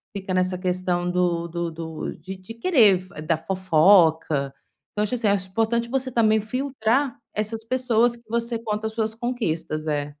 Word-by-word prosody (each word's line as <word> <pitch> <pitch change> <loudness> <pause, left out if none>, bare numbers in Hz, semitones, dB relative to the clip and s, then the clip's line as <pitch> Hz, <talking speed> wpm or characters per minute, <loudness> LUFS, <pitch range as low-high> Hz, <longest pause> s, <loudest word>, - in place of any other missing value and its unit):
fica 190 -1 -4
nessa 185 0 +1
questão 180 -1 -1
do 175 -1 0
do 170 0 -3
do 160 -1 -5
de 190 +1 -8
de 185 +5 -10
querer 230 - +4
f 180 -4 -11
da 160 0 0
fofoca. 160 -5 +3 0.4
Então 210 - -1
acho 230 +4 -1
assim, 230 -3 0
acho 190 -2 +1
importante 230 +3 0
você 265 0 -1
também 220 -2 +3
filtrar 255 +2 0 0.2
essas 220 +1 -3
pessoas 240 -1 +2
que 235 -1 -21
você 235 0 -1
conta 220 -1 -2
as 220 - -7
suas 220 -1 -2
conquistas 165 -10 -2
é. 145 -1 -2
205 Hz, 170 wpm, -24 LUFS, 175-230 Hz, 0.4 s, querer